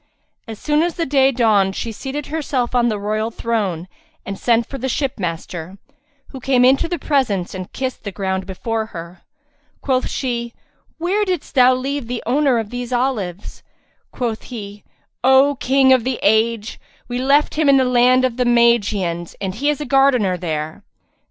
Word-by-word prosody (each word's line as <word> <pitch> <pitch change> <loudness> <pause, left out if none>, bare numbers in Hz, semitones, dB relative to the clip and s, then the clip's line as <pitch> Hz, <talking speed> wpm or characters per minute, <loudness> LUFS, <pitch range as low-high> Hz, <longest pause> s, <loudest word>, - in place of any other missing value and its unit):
As 220 -1 -7
soon 300 +5 +1
as 345 0 -1
day 275 -5 +2
dawned 210 -6 +2
she 230 - -4
seated 270 +6 -5
herself 280 -6 -2
on 240 -1 +3
the 215 - -1
royal 215 +2 -2
throne 205 -7 -2 0.4
and 195 - -4
sent 230 +3 +1
for 275 - -7
the 265 +2 -2
ship 270 -1 -2
master, 170 +1 -5 0.5
who 265 - -9
came 250 -1 +3
into 265 +5 +4
the 350 0 -2
presence 255 - 0
and 185 -1 -7
kissed 260 -1 -4
the 200 - -5
ground 190 -1 -3
before 220 +3 -3
her. 170 +2 -9 0.6
Quoth 260 -2 0
she, 235 -3 -3 0.4
"Where 370 +6 0
didst 365 -6 -3
thou 255 -2 +5
leave 270 0 -3
the 245 0 -4
owner 270 +1 +2
of 220 -2 -3
these 245 0 -5
olives?" 225 -8 -2 0.5
Quoth 235 -4 -3
he, 205 -4 -8 0.4
"O 265 +2 +5
King 265 0 +4
of 255 -3 +3
the 255 0 -1
age, 220 +1 +1 0.3
we 245 0 -3
left 280 +3 +3
him 305 -2 +2
in 275 - +6
the 260 - +3
land 250 +1 +4
of 250 -2 -2
the 250 - +2
Magians 210 -8 +1
and 190 -2 -3
he 275 +8 -1
is 295 - 0
a 300 - -4
gardener 255 -8 +3
there." 160 +1 -4
240 Hz, 175 wpm, -19 LUFS, 205-270 Hz, 0.6 s, in